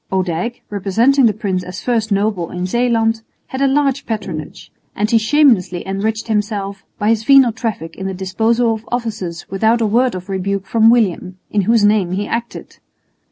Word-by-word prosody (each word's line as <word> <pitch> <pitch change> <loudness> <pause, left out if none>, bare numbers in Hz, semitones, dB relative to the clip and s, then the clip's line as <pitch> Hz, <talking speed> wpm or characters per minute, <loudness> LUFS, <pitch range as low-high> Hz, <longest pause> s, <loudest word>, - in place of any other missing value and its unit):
Odijk, 185 +5 -2
representing 230 +7 +3
the - - +3
prince 195 -4 -2
as 180 +1 -8
first 225 -3 0
noble 200 -4 0
in 180 0 -4
Zeeland, 225 +1 +1 0.3
had 265 - -4
a 275 - +4
large 275 0 0
patronage; 190 -9 -6 0.2
and 210 +3 -1
he 230 - +5
shamelessly 220 - +2
enriched 215 +4 -2
himself 205 -2 -2
by 210 - 0
his 225 -1 +1
venal 270 -1 +6
traffic 220 -8 -5
in 190 - -5
the 190 - -3
disposal 225 +5 +1
of 220 0 -8
offices 215 -8 -4
without 220 +4 +2
a 230 - +1
word 240 +3 +2
of 185 +1 -7
rebuke 195 0 -2
from 225 +2 +4
William, 190 -5 +1
in 210 - +2
whose 230 -3 +4
name 205 -4 +2
he 200 +2 -2
acted. 235 +2 -5
215 Hz, 175 wpm, -17 LUFS, 190-235 Hz, 0.3 s, venal